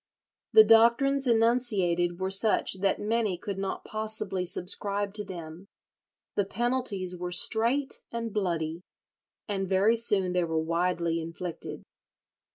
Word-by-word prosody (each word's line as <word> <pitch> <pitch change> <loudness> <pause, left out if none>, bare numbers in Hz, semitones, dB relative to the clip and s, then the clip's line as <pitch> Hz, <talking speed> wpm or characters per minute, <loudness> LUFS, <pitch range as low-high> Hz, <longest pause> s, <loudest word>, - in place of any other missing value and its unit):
The 435 - +9
doctrines 260 - +4
enunciated 210 -7 +2
were 190 0 -2
such 195 -1 +2
that 195 0 +1
many 215 -3 -1
could 195 +2 -6
not 195 0 -4
possibly 215 -4 -1
subscribe 200 +3 -2
to 210 0 -2
them; 175 -1 -9 0.7
the 205 - +1
penalties 215 -4 -1
were 180 0 -5
"strait 235 +9 0
and 230 -2 -4
bloody," 170 -5 -2 0.7
and 195 -2 -3
very 195 +4 +3
soon 200 -5 +2
they 180 -1 +1
were 165 -1 -2
widely 170 +1 -1
inflicted. 165 +1 -7
195 Hz, 125 wpm, -28 LUFS, 180-225 Hz, 0.7 s, The